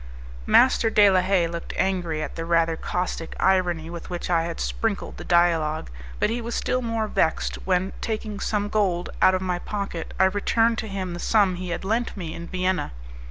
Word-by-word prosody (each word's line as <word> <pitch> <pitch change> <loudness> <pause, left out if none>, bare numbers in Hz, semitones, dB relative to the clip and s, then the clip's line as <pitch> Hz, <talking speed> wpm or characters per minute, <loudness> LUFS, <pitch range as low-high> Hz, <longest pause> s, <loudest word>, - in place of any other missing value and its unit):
Master 245 -2 +5
de 210 -2 +6
la 185 -1 +4
Haye 185 -2 +2
looked 170 0 -5
angry 175 -5 0
at - - -6
the 165 - -4
rather 165 -1 +2
caustic 180 -1 -3
irony 180 -4 +2
with 170 0 -8
which 175 0 -4
I 165 -1 +2
had 170 -1 -5
sprinkled - - -2
the - - -7
dialogue; 165 - +2 0.3
but - - +2
he 240 +1 -2
was 235 +1 -4
still 255 - 0
more 230 -2 -1
vexed 160 -6 0
when, 185 +1 +1
taking 215 -2 -3
some 205 0 -1
gold 190 -5 0
out 185 - +6
of 185 - -2
my 180 -1 -1
pocket, 200 -4 -5
I - - +6
returned 225 +4 +2
to 220 - -4
him 190 -3 -4
the 175 - -6
sum 200 -1 +3
he 180 0 -5
had 170 +2 -4
lent 225 +2 -1
me 165 -4 -5
in 170 - -7
Vienna. 185 - -1
185 Hz, 200 wpm, -24 LUFS, 170-205 Hz, 0.3 s, de